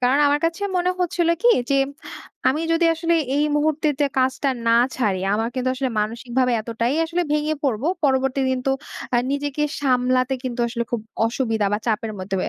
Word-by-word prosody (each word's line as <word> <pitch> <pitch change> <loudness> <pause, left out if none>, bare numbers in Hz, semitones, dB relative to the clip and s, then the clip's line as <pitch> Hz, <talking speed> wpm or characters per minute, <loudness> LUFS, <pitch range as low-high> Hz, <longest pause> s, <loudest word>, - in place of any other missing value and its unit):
কারণ 260 +3 +3
আমার 290 +1 +2
কাছে 330 +4 -1
মনে 360 +1 +2
হচ্ছিল 345 -1 +1
কি? 480 - +5 0.2
যে - - +3 0.7
আমি 295 +4 +1
যদি 330 +1 +2
আসলে 335 +1 0 0.2
এই 295 - +3
মুহূর্তে 310 +1 +1
তে 290 - +5
কাজটা 265 +2 +1 0.2
না 230 - +4 0.2
ছাড়ি 205 -7 0 0.2
আমার 225 +2 0
কিন্তু 255 0 -1
আসলে 260 -1 -2
মানসিকভাবে 240 +3 -1
এতটাই 230 +4 -1
আসলে 340 +2 -1
ভেঙে 300 +1 +1
পড়বো। 265 +3 0 0.2
পরবর্তী 270 0 +2
দিন 260 -1 0
তো - - +3 0.4
আ - - +5 0.2
নিজেকে 290 +1 -2 0.2
সামলাতে 255 -1 +2
কিন্তু 245 -1 -3
আসলে 235 0 -3
খুব 240 - -1 0.3
অসুবিধা 225 -3 0
বা 210 - +1
চাপের 220 -1 -1
মধ্যে 190 +1 -4
260 Hz, 180 wpm, -22 LUFS, 235-295 Hz, 0.7 s, কি